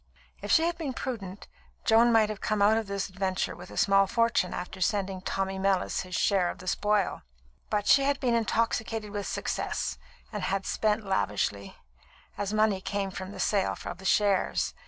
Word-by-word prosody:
If -, -, -4 dB
she 325 Hz, -, +5 dB
had 340 Hz, 0 st, -1 dB
been 290 Hz, -5 st, -3 dB
prudent, 205 Hz, -6 st, -5 dB, 0.4 s
Joan 230 Hz, +2 st, +5 dB
might 220 Hz, -2 st, +4 dB
have 215 Hz, -2 st, -5 dB
come 215 Hz, -1 st, 0 dB
out 205 Hz, +2 st, +5 dB
of 225 Hz, -2 st, -1 dB
this 200 Hz, -1 st, -2 dB
adventure 190 Hz, -2 st, -2 dB
with 180 Hz, +2 st, -11 dB
a -, -, -10 dB
small 195 Hz, 0 st, +4 dB
fortune 230 Hz, -4 st, +1 dB
after 180 Hz, +1 st, -6 dB
sending 195 Hz, -2 st, 0 dB
Tommy 190 Hz, 0 st, -2 dB
Mellis 195 Hz, -1 st, +1 dB
his 180 Hz, -1 st, -6 dB
share 190 Hz, -2 st, +2 dB
of -, -, -6 dB
the 185 Hz, -, -12 dB
spoil; 210 Hz, 0 st, +1 dB, 0.5 s
but 205 Hz, -1 st, 0 dB
she 275 Hz, -, +6 dB
had 280 Hz, 0 st, +1 dB
been 245 Hz, -3 st, +1 dB
intoxicated 225 Hz, -1 st, 0 dB
with 205 Hz, -1 st, -4 dB
success, -, -, -2 dB, 0.3 s
and -, -, -3 dB
had 195 Hz, 0 st, -1 dB
spent 215 Hz, 0 st, 0 dB
lavishly, 105 Hz, -, -1 dB, 0.6 s
as 205 Hz, -1 st, -3 dB
money 215 Hz, -3 st, +2 dB
came 200 Hz, 0 st, -2 dB
from 190 Hz, 0 st, -6 dB
the -, -, -9 dB
sale 200 Hz, -3 st, +1 dB
of 175 Hz, -, -6 dB
the -, -, -12 dB
shares. 200 Hz, 0 st, +2 dB
200 Hz, 185 wpm, -28 LUFS, 190-220 Hz, 0.6 s, she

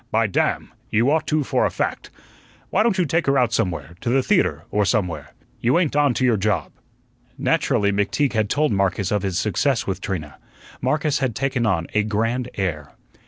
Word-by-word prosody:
By 115 Hz, -1 st, +2 dB
damn! 100 Hz, -, -1 dB, 0.2 s
you 115 Hz, +6 st, +2 dB
ought 160 Hz, +1 st, +1 dB
to, 155 Hz, -1 st, +1 dB
for -, -, 0 dB
a -, -, +2 dB
fact. -, -, -3 dB, 0.6 s
Why 200 Hz, -, +3 dB
don't 220 Hz, -3 st, +2 dB
you 180 Hz, -, +2 dB
take 165 Hz, +2 st, 0 dB
her 140 Hz, 0 st, +3 dB
out 120 Hz, -3 st, +2 dB
somewhere 85 Hz, -4 st, -1 dB
to -, -, -2 dB
the 130 Hz, +2 st, +2 dB
theatre, 85 Hz, -, +1 dB
or 105 Hz, -, +2 dB
somewhere? 95 Hz, -5 st, -1 dB, 0.2 s
You 125 Hz, +6 st, +2 dB
ain't 170 Hz, -5 st, +1 dB
on 145 Hz, -4 st, +3 dB
to 130 Hz, -, +1 dB
your 120 Hz, -3 st, +3 dB
job." 95 Hz, -7 st, -1 dB, 0.7 s
Naturally, 100 Hz, 0 st, +1 dB
McTeague 105 Hz, +8 st, 0 dB
had 110 Hz, -2 st, 0 dB
told 150 Hz, +4 st, +1 dB
Marcus 100 Hz, -1 st, 0 dB
of 105 Hz, -1 st, +1 dB
his 95 Hz, -3 st, -2 dB
success 115 Hz, +5 st, 0 dB
with 95 Hz, -1 st, -3 dB
Trina. 80 Hz, -8 st, -5 dB, 0.4 s
Marcus 150 Hz, -1 st, +1 dB
had 130 Hz, -5 st, -1 dB
taken 130 Hz, -3 st, 0 dB
on 85 Hz, -5 st, +1 dB
a 105 Hz, -, +3 dB
grand 115 Hz, +4 st, -1 dB
air. 85 Hz, -7 st, -3 dB
115 Hz, 195 wpm, -22 LUFS, 100-140 Hz, 0.7 s, Why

